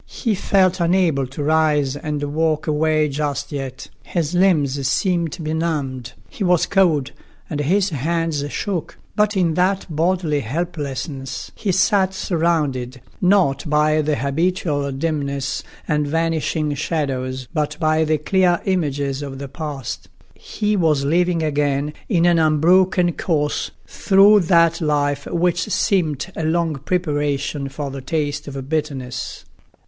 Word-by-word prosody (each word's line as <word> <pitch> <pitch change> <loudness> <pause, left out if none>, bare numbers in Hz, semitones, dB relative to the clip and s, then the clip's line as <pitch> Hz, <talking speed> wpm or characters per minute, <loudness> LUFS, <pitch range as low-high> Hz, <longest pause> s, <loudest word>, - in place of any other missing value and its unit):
He 230 -4 -2
felt 190 -2 +2
unable 170 -6 +2
to 135 +3 -5
rise 150 -3 +2
and 150 0 -4
walk 155 -1 +1
away 155 0 +2
just 145 0 -3
yet; 135 -2 -5
his 170 -2 -2
limbs 145 -8 +2
seemed 170 0 0
benumbed; 150 -6 -2
he 205 - -6
was 180 -2 +3
cold, 160 -9 +2 0.4
and 150 - -2
his 185 +6 +1
hands 160 +1 -1
shook. 185 -6 -3 0.2
But 210 -1 +2
in 170 -3 +2
that 185 +3 +1
bodily 165 -2 +1
helplessness 140 -1 -4
he 205 - -2
sat 190 0 +2
surrounded, 150 -9 -1 0.2
not 180 -7 +2
by 155 +1 +3
the 150 0 0
habitual 145 +1 -1
dimness 140 -2 -2 0.3
and 150 -1 +1
vanishing 160 -1 0
shadows, 130 -4 -2
but 150 -2 -1
by 155 0 +2
the 155 0 +1
clear 175 +3 +2
images 145 -7 -1
of 140 -2 -6
the 140 +1 -6
past; 140 -2 -6 0.2
he 210 -1 -2
was 155 -7 +2
living 170 +2 +2
again 145 -1 0 0.2
in 175 -6 +3
an 175 -1 +4
unbroken 175 +3 +3
course 150 -4 -1 0.2
through 200 +2 +5
that 170 -2 +3
life 145 -2 0
which 175 +2 0
seemed 180 -5 0
a 160 - -3
long 160 -1 0
preparation 145 -3 -1
for 140 0 -5
the 135 0 -6
taste 145 +1 -2
of 135 -2 -6
bitterness. 140 -5 -4
155 Hz, 135 wpm, -20 LUFS, 140-175 Hz, 0.4 s, through